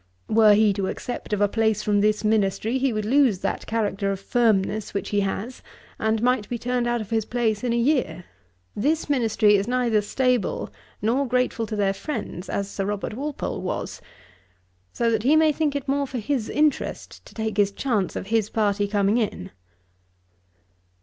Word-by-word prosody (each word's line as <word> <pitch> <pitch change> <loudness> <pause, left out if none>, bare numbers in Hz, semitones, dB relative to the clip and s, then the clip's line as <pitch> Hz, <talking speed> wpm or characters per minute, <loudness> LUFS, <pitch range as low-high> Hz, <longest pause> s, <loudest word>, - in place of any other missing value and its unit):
Were 215 -1 +6
he 210 -1 +4
to 195 -1 -2
accept 245 - -5
of 210 -1 0
a 205 - +5
place 220 0 0
from 205 -1 +2
this 210 +1 +1
ministry, 215 +3 +1
he 265 0 +1
would 215 -2 -2
lose 255 -3 +3
that - - -3
character 205 -3 -1
of 195 - -3
firmness 215 -2 0
which 200 - -2
he 205 - +1
has, 200 +5 -3 0.4
and 220 +1 0
might 245 -4 +1
be 240 - -2
turned 245 0 -1
out 240 -1 0
of 215 - -9
his 225 -1 +1
place 220 -2 -1
in 245 - 0
a 235 - +1
year. 240 - 0 0.5
This 300 +6 0
ministry 220 -5 +3
is 200 +2 -2
neither 240 -4 +2
stable, 250 - 0 0.3
nor 255 +6 +1
grateful 250 -2 0
to 215 - -4
their 200 -2 +1
friends, 205 - -5
as 200 - -2
Sir 195 -1 -4
Robert 205 +1 -3
Walpole 285 +5 -4
was, - - -4 0.9
so 235 -1 0
that 220 -1 +1
he 275 +7 +4
may 315 0 +5
think 295 -1 -1
it 280 - -3
more 280 +1 0
for 260 - -5
his 240 0 -2
interest 300 -1 -1
to - - -16
take 220 -2 -3
his 200 -1 +3
chance 210 -4 -1
of - - -4
his 220 -2 +2
party 205 -2 +1
coming 205 +2 +2
in.' 205 - -3
220 Hz, 185 wpm, -24 LUFS, 205-250 Hz, 0.9 s, Were